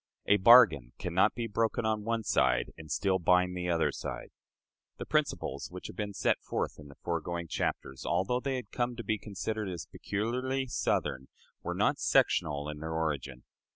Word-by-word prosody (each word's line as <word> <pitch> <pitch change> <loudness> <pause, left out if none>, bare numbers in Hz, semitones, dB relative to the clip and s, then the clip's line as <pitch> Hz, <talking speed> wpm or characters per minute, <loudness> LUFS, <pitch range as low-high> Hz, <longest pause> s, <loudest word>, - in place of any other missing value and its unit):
A 100 - +5
bargain 95 - +7
can 90 - -4
not 95 +4 +3
be 120 - -2
broken 115 +1 0
on 110 -1 0
one 115 0 -1
side, - - +2
and 80 -2 -11
still 95 +1 +1
bind 90 +1 +3
the 90 0 -3
other 85 -1 +2
side." - - -6 0.7
The - - -6
principles 70 +1 -1
which 90 +1 -9
have - - -7
been 100 +1 -4
set - - +1
forth - - -3
in 75 - -11
the 70 - -14
foregoing 85 0 -3
chapters, 65 -3 -3
although 125 +7 +1
they 135 +1 -2
had 125 - -6
come 120 -1 -1
to 115 - -6
be 110 -1 -1
considered 105 +1 -4
as 85 -4 -5
peculiarly 125 +6 -2
Southern, 65 - -1 0.3
were - - -3
not - - +2
sectional 75 -1 +2
in 75 0 -6
their 80 +1 -4
origin. 70 -5 -2
95 Hz, 185 wpm, -30 LUFS, 80-115 Hz, 0.7 s, bargain